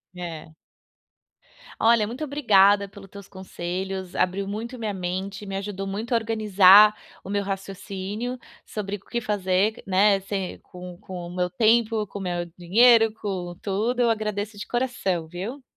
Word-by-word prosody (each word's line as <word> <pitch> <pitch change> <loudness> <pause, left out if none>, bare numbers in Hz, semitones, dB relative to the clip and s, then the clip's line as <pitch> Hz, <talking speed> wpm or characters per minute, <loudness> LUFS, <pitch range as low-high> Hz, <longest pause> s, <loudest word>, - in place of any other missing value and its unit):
É. 165 -3 -7 1.3
Olha, 225 -1 +4
muito 250 +7 -6
obrigada 205 -8 +4
pelos 195 -1 -14
teus 200 0 -11
conselhos, 190 0 -5
abriu 185 +2 0
muito 230 +5 -5
minha 220 -3 -3
mente, 190 +2 -4
me 195 0 -5
ajudou 195 -1 -5
muito 220 +6 -4
a - - +4
organizar 210 -2 +6 0.3
o 190 - -10
meu 200 0 0
raciocínio 195 +4 -5 0.3
sobre 205 -1 -4
o - - -22
que 235 +4 -4
fazer, 205 +1 0
né, 195 +1 +4
se 195 -2 -4
com 180 -1 -10
com 180 -2 -8
o 175 - -9
meu 180 0 0
tempo, 220 +2 +2
com 200 - -8
o - - -6
meu 175 -2 -2
dinheiro, 225 +5 +5
com 185 -5 -5
tudo. 220 +5 -1
Eu 235 - +3
agradeço 210 -1 -2
de 205 - -7
coração, 195 -9 -1
viu. 200 - -7
200 Hz, 155 wpm, -24 LUFS, 185-220 Hz, 1.3 s, organizar